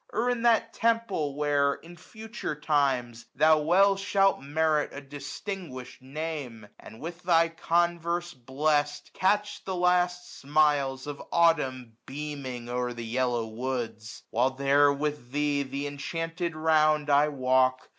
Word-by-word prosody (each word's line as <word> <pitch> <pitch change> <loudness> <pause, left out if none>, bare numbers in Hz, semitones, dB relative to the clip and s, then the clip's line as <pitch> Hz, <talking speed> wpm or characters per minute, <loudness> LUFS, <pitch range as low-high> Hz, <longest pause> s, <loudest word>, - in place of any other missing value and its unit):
Or 240 +3 0
in 245 -1 -2
that 230 -1 +3
Temple 225 -11 0
where, 145 -1 +1
in 170 +1 -14
future 220 -4 -7
times, 130 -6 0
^rhou 155 -1 +5
well 195 +5 +4
shalt 195 0 +2
merit 150 +1 +1
a - - -7
distinguish'd 145 0 -7
name; 135 -5 -6
And, 110 - -13
with 170 +2 -7
thy 165 -1 +3
converse 170 +1 0
blest, 145 +3 -1
catch 205 +2 0
the 190 - -4
last 180 0 0
smiles 140 -2 +1
1050 145 - -3
Of - - -13
Autumn 130 -9 +1
beaming 135 -4 -6
o'er 125 0 -2
the 120 -1 -7
yellow 120 0 0
woods. 115 -1 -5
While 125 +3 +2
there 140 +2 +3
with 145 -3 -3
thee 145 0 0
th' 140 +1 -5
inchanted 165 +4 -4
round 155 -1 +2
I 145 +1 +5
walk. 130 -2 +1
150 Hz, 135 wpm, -27 LUFS, 130-170 Hz, -, ^rhou